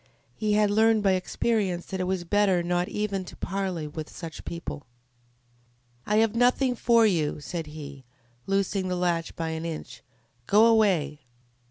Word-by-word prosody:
He 215 -1 0
had 210 -1 +3
learned 220 0 +3
by 195 - +4
experience 185 -1 0
that 190 - -5
it 185 - 0
was 185 -1 -1
better 190 -1 +2
not 175 +1 0
even 200 -2 -2
to - - -11
parley 185 -4 -3
with 155 +1 -7
such 165 -2 -8
people. 170 -5 -6 1.2
"I 210 - +1
have 220 0 +3
nothing 250 +2 +3
for 230 -1 +4
you," 160 -8 +1
said 165 +1 -5
he, 145 -3 -9 0.4
loosing 195 -1 0
the 180 - -1
latch 175 -2 -1
by 165 -1 -3
an 160 0 -4
inch. 165 -2 -6 0.5
"Go 210 +3 +6
away!" 190 -11 +3
185 Hz, 160 wpm, -26 LUFS, 165-210 Hz, 1.2 s, Go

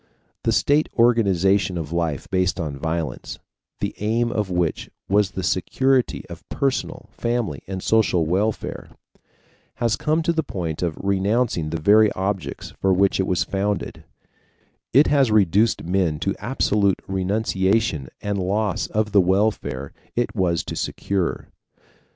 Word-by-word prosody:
The - - +3
state 150 +2 +2
organization 100 -6 +3
of 80 -2 -5
life 85 -4 -1
based 95 0 +1
on 75 -4 -3
violence, 80 -3 -3 0.4
the - - -2
aim 115 +3 0
of 105 -3 -1
which 90 -4 -1 0.2
was 100 0 +3
the 95 - -5
security 130 +10 +1
of - - -9
personal, 135 -1 -2
family, 120 -2 -2
and 95 -1 -5
social 105 -7 +2
welfare, 100 +7 -2 0.9
has 115 -2 +1
come 155 +6 0
to 170 - +1
the 160 - +1
point 85 - -4
of 85 -3 -1
renouncing 100 -2 0
the 80 +1 -3
very 105 +5 +5
objects 95 0 -3
for 95 - +3
which 95 +1 +3
it 95 - +1
was 90 - +1
founded 100 +1 -2 0.9
it 140 +5 +6
has 140 -4 +3
reduced 105 +1 +3
men 90 -3 0
to 100 - 0
absolute 105 -4 +1
renunciation 95 - 0
and 100 -1 -1
loss 100 +2 0
of 105 0 -1
the 100 - +6
welfare 95 -8 0 0.2
it 120 0 -1
was 90 -5 +1
to - - -6
secure. 95 -3 -2
100 Hz, 140 wpm, -22 LUFS, 90-110 Hz, 0.9 s, it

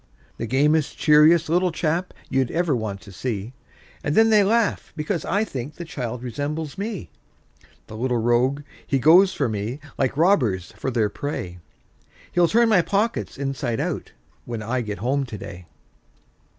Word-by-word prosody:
The 115 - -4
gamest, 150 +4 +2
cheeriest 155 +2 +5
little 175 +3 +2
chap, 165 +3 -1 0.2
you'd 130 -2 0
ever 165 -4 +1
want 105 -4 -4
to 100 -1 -13
see! 110 +2 -4 0.5
And 145 - -1
then 225 0 +5
they 210 -2 +6
laugh, 225 +2 +1
because 160 +3 -2
I 205 +2 +1
think 140 - -6
the 170 - -7
child 125 -5 -5
resembles 145 +5 -4
me. 200 - -5 0.7
The 110 - -10
little 125 +2 0
rogue! 120 +5 +1 0.2
he 135 - +1
goes 175 +9 +6
for 140 - 0
me, 110 +5 -3 0.2
like 135 0 0
robbers 125 - +2
for - - -3
their 115 -4 +1
prey; 95 -9 -5 0.7
He'll 175 -1 +4
turn 235 +5 +4
my 210 -5 +5
pockets 205 +6 -1
inside 135 -4 -2
out, - - -3 0.3
when 115 -2 -5
I 125 +4 -1
get 105 -3 -5
home 135 +5 0
to 110 - -7
day. 95 -4 -9
140 Hz, 165 wpm, -23 LUFS, 115-170 Hz, 0.7 s, they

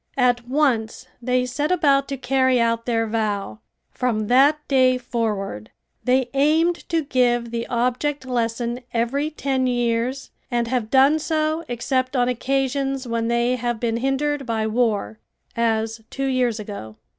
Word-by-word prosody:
At 245 -2 +2
once 255 -5 0 0.2
they 250 +1 +1
set 290 +6 -2
about 280 -6 +3
to 275 - -4
carry 260 0 +2
out 230 0 0
their 225 -1 +1
vow. 210 - -2 0.3
From 220 -4 -1
that 285 +4 +4
day 255 -2 +4
forward 210 - -3 0.3
they 255 0 +1
aimed 315 +5 +2
to 330 -2 +1
give 240 -3 +1
the 235 0 -3
object 255 +4 -1
lesson 235 -1 -1 0.2
every 270 +6 0
ten 270 -4 -1
years 245 +2 -1 0.2
and 240 -1 0
have 235 -3 -1
done 275 +4 +5
so 310 +1 -1
except 255 +2 -1
on 245 -1 +2
occasions 270 +1 -1
when 230 -1 -1
they 235 +1 +1
have 240 -1 -2
been 230 -1 -1
hindered 270 +2 -1
by 220 -2 -1
war, 215 - 0 0.4
as 225 -1 0
two 275 - -3
years 250 -4 +1
ago. 200 - -7
250 Hz, 145 wpm, -22 LUFS, 230-270 Hz, 0.4 s, done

